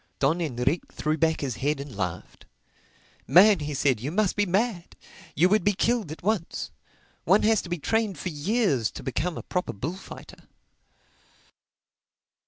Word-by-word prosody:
Don 155 +6 +1
Enrique 140 +1 -1
threw 155 +1 -1
back 160 +1 +1
his 135 -3 -3
head 145 +1 -1
and 140 -4 -8
laughed. 90 -4 -5 0.8
"Man," 200 +1 +7
he 150 -1 -4
said, 130 -4 +2
"you 130 +6 -4
must 200 +1 +1
be 205 -1 +1
mad! 190 -1 -1 0.4
You 170 +5 +5
would 210 -1 +3
be 205 - +3
killed 220 -3 0
at 155 -1 -9
once. 200 -4 -2 0.5
One 195 +5 +4
has 220 -1 +3
to 175 - -10
be 175 - -1
trained 215 +3 0
for 180 - -4
years 155 - 0
to - - -8
become 155 +6 -2
a - - -6
proper 180 - -3
bullfighter." 160 - -8
170 Hz, 160 wpm, -26 LUFS, 145-205 Hz, 0.8 s, Man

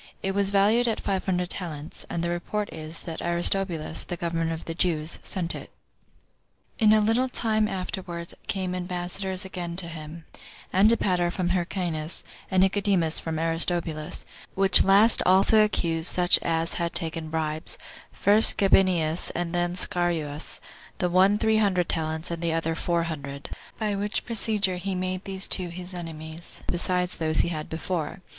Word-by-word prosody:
It 195 - 0
was 200 0 +1
valued 210 +5 +3
at 225 - 0
five 195 -2 -2
hundred 180 -1 -1
talents; 160 -4 -5
and 170 - -3
the 170 - -1
report 205 +4 -3
is, 155 +1 -8
that 165 -2 -6
Aristobulus, 170 -2 +1
the 175 - -6
governor 165 -1 -2
of 165 0 -6
the 165 - -4
Jews, 165 -2 -1
sent 175 -3 -3
it." - - -8 1.1
2. 225 - +2
In 210 - +7
a 215 - +5
little 230 +5 +2
time 220 -3 +1
afterward 180 -3 -5
came 185 -2 -2
ambassadors 180 +1 -3
again 175 -2 -5
to 175 -1 -1
him, 160 0 -9 0.5
Antipater 190 -3 +3
from 175 0 -2
Hyrcanus, 175 -3 -2 0.3
and 185 -1 +3
Nicodemus 190 -4 +1
from 160 -1 -4
Aristobulus; 165 -1 -1 0.3
which 195 -1 +7
last 205 +4 +6
also 195 +4 +5
accused 165 -5 +1
such 180 0 +4
as 165 0 0
had 170 0 -2
taken 160 -1 0
bribes; 155 -1 -2 0.3
first 210 +3 +4
Gabinius, 180 -4 +3
and 175 0 -2
then 175 0 0
Scaurus, 170 -5 -1 0.4
the 180 -1 -1
one 190 +3 +4
three 220 0 +2
hundred 190 -5 +2
talents, 160 +1 -1
and 170 0 -4
the 165 -1 0
other 165 0 -1
four 170 +1 -1
hundred; 140 -4 -6 0.3
by 215 -2 -1
which 205 +1 -2
procedure 210 -5 +1
he 190 +1 -3
made 185 +1 -3
these 195 0 -1
two 180 -2 0
his 180 +2 -7
enemies, 165 -1 -8
besides 180 0 -1
those 155 -1 +2
he - - -2
had 155 -3 -5
before. 160 0 -3
175 Hz, 160 wpm, -26 LUFS, 165-195 Hz, 1.1 s, In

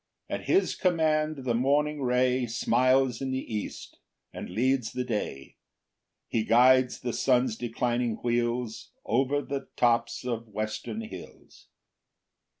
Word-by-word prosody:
7 - - -2
At - - -13
his 385 - +3
command 155 -5 +1
the 120 - +1
morning 145 +4 +1
ray 125 0 +2
Smiles 125 +2 +2
in 135 - -2
the 130 -3 -4
east, 105 - -6 0.3
and - - -7
leads 125 0 0
the 125 - -2
day; 105 - -4 0.7
He 110 - 0
guides 125 +3 +4
the 120 -2 -3
sun's 125 -3 +2
declining 120 0 -1
wheels 120 -1 -1
Over 135 +5 +1
the 140 0 -5
tops 120 0 +1
of 115 -2 -3
western 110 - -4
hills. 225 - -11
125 Hz, 130 wpm, -28 LUFS, 115-135 Hz, 0.7 s, guides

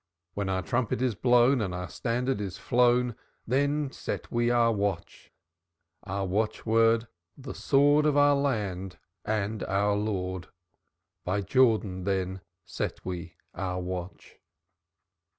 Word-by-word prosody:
When 100 -1 -2
our 95 -1 -1
trumpet 115 +2 -1
is 125 -2 +1
blown, 125 +3 +4
And 95 -4 -2
our 90 0 -4
standard 120 - -2
is 95 -3 -5
flown, 125 0 +2 0.3
Then 140 +3 +1
set - - -5
we 120 0 +1
our 120 -1 +4
watch. 100 -5 -3 0.7
Our 95 +1 -2
watchword, 115 +3 +2 0.3
'The 130 -1 -7
sword 145 +2 +3
Of 145 -1 +2
our 145 0 +6
land 100 -10 -2 0.3
and 105 0 -1
our 100 +1 +1
Lord' 95 -4 -2 0.8
By 100 +3 -1
Jordan 105 -5 +2
then 95 -1 -1 0.2
set - - -4
we 85 -2 -5 0.2
our 90 -1 -3
watch. 90 0 -7
105 Hz, 125 wpm, -28 LUFS, 95-125 Hz, 0.8 s, our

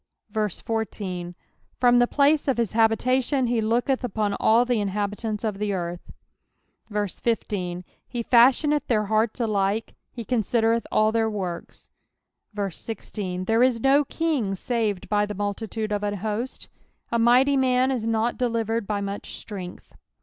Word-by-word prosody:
14 205 -4 -3 0.4
From 245 -1 +5
the 245 - +4
place 290 +3 +3
of 270 - +1
his 230 -3 0
habitation 255 +4 +2
he 235 -1 +1
looketh 240 +4 +1
upon 215 -3 -1
all 230 +3 +4
the 245 -2 +1
in 205 - -1
habitants 210 +2 -3
of 210 -3 -2
the 210 -1 -1
earth. 175 -1 -5 0.8
15 205 -3 -2 0.2
He 240 -2 -4
fashioneth 265 +6 +4
their 215 -3 +1
hearts 220 +3 0
alike; 210 -1 0 0.2
he 235 -2 -7
considereth 230 0 +1
all 215 0 +3
their 225 0 +1
works. 185 -5 -6 0.8
16 185 -2 -5
There 225 +3 +2
is 250 -2 +3
no 275 +4 +4
kin^ 275 -11 -1
saved 220 -4 -1
by 210 0 +1
the 210 - -5
multitude 210 +2 -3
of 205 -1 0
an 205 0 -1
host; 220 +5 -4 0.4
a 235 - +1
mighty 250 +4 +5
man 260 0 +2
is 235 -4 -2
not 225 +1 0
delivered 230 -3 -1
by 205 -1 -1
much 200 0 -5
strength. 185 -4 -8
225 Hz, 145 wpm, -25 LUFS, 205-245 Hz, 0.8 s, From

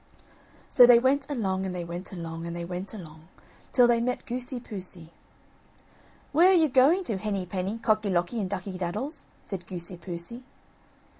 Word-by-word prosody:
So 245 -2 +8
they 245 -1 +9
went 270 +4 +2
along, 195 -9 -1
and 185 -1 -3
they 175 - -3
went 175 +2 -6
along, 165 -2 -6
and 170 - -5
they 170 0 -4
went 180 +2 -5
along, 160 -6 -11 0.4
till 245 - +6
they 235 -1 +3
met 250 +1 -2
Goosey 250 0 -3
poosey, 185 -7 -6 1.2
"Where 340 +5 +6
are - - +6
you 320 -3 +4
going 280 +9 +4
to, 220 - -1
Henny 195 -2 -2
penny, 190 +4 -3
Cocky 215 -2 +1
locky 180 +5 0
and 190 - -3
Ducky 185 -1 -5
daddles?" 265 - -4 0.2
said 185 -3 -6
Goosey 175 0 -3
poosey. 175 +7 -5
195 Hz, 170 wpm, -27 LUFS, 175-245 Hz, 1.2 s, they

